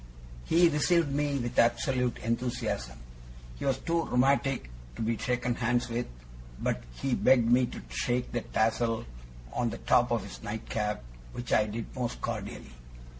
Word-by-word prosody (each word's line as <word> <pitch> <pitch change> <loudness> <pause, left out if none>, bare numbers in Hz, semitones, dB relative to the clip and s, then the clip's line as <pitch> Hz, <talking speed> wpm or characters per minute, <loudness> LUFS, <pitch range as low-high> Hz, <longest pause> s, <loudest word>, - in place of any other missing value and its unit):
He 170 +1 +5
received 165 0 +2
me 145 0 +1
with 120 -1 -1
absolute 125 +1 +2
enthusiasm. 115 - -2 0.6
He - - -4
was 135 -2 +2
too 165 +2 0
rheumatic 135 - +2 0.2
to - - -3
be 115 +1 +1
shaken 125 0 0
hands 120 0 0
with, 120 +1 -2 0.5
but 60 - -1
he 135 - -1
begged 120 -2 +4
me 125 0 +5
to - - -7
shake 120 - -1
the 120 - -1
tassel 115 - 0 0.5
on 120 -1 0
the - - -5
top - - +3
of - - 0
his - - -9
nightcap, 105 - -3 0.3
which 120 - -3
I 105 - +4
did 110 +2 -6
most 125 -2 -3
cordially. 65 - -5
120 Hz, 155 wpm, -30 LUFS, 115-135 Hz, 0.6 s, He